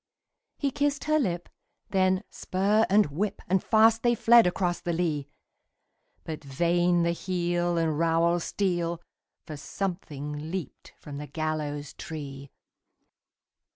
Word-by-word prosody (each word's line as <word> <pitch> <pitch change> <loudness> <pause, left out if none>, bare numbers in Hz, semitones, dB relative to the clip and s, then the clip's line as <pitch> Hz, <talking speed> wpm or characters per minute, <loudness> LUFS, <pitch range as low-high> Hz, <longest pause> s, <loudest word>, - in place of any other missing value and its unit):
He 280 -2 0
kissed 285 +1 0
her 310 0 +2
lip; 175 - -1 0.4
then 185 0 +2
spur 205 +4 +1
and 205 +2 +5
whip! 200 +7 -2
And 190 +1 +2
fast 225 0 +4
they 240 -1 +3
fled 230 -1 +6
across 175 -1 0
the 175 -1 -2
lea! 160 -5 -1 1.0
But 155 -2 -6
vain 175 +5 +2
the 170 - +2
heel 175 -1 -1
and 160 -2 0
rowel 165 +1 +3
steel, 175 -3 -1 0.5
For 155 - -7
something 150 -4 -5
leaped 180 -5 -6
from 145 -1 -9
the 150 +1 -6
gallows 150 -2 -3
tree! 140 -4 -7
175 Hz, 125 wpm, -27 LUFS, 155-195 Hz, 1.0 s, fled